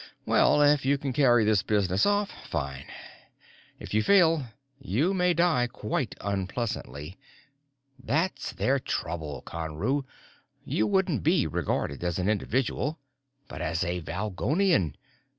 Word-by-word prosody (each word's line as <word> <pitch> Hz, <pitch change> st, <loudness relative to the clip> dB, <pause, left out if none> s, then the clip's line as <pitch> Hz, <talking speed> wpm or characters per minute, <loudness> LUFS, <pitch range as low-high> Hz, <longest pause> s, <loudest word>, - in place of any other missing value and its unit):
"Well, 150 Hz, -, +4 dB
if 145 Hz, -1 st, +4 dB
you 140 Hz, +2 st, +2 dB
can 140 Hz, -2 st, -3 dB
carry 120 Hz, -5 st, +4 dB
this 105 Hz, -2 st, +3 dB
business 100 Hz, -2 st, +1 dB
off 205 Hz, 0 st, +1 dB, 0.2 s
fine. 70 Hz, -4 st, -4 dB, 0.9 s
If -, -, -8 dB
you 110 Hz, -, +3 dB
fail, 165 Hz, -, +4 dB, 0.4 s
you 135 Hz, -, 0 dB
may 180 Hz, -2 st, +2 dB
die 165 Hz, -8 st, +3 dB
quite 110 Hz, 0 st, -3 dB
unpleasantly. 95 Hz, -, -4 dB, 0.8 s
That's 160 Hz, +10 st, -1 dB
their 135 Hz, +1 st, +1 dB
trouble, 80 Hz, -, -4 dB
Conru: 85 Hz, -, -2 dB, 0.6 s
you 110 Hz, -, 0 dB
wouldn't 180 Hz, -, +1 dB
be -, -, +3 dB
regarded 70 Hz, +4 st, -2 dB
as 85 Hz, -1 st, -1 dB
an 95 Hz, +2 st, 0 dB
individual, 130 Hz, -, -1 dB, 0.5 s
but -, -, -8 dB
as 85 Hz, +3 st, -1 dB
a 90 Hz, 0 st, -2 dB
Valgolian. 100 Hz, -, 0 dB
110 Hz, 125 wpm, -27 LUFS, 90-145 Hz, 0.9 s, Well